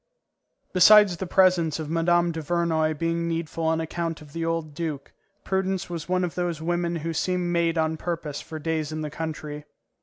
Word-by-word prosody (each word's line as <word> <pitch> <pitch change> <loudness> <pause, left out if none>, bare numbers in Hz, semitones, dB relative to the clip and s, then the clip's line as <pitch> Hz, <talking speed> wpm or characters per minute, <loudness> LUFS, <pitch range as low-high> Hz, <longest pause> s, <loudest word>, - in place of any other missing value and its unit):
Besides 195 0 +7
the 190 - -4
presence 180 -5 +3
of 155 -2 -5
Mme. 170 +1 +2
Duvernoy 160 -1 0
being 165 +1 -1
needful 165 0 -3
on 160 0 +2
account 165 0 -3
of 150 -2 -14
the 165 - -3
old 165 -2 -2
duke, 150 -3 -5 0.3
Prudence 190 -1 -1
was 165 -1 -5
one 185 0 +1
of 175 - -2
those 175 -3 -2
women 175 +1 -1
who 165 - -1
seem 180 +1 0
made 170 -1 +1
on 160 0 +1
purpose 165 -4 -4
for 160 - -8
days 155 -1 -2
in 155 0 -4
the 150 -1 -4
country. 150 -2 -5
165 Hz, 180 wpm, -25 LUFS, 160-175 Hz, 0.3 s, Besides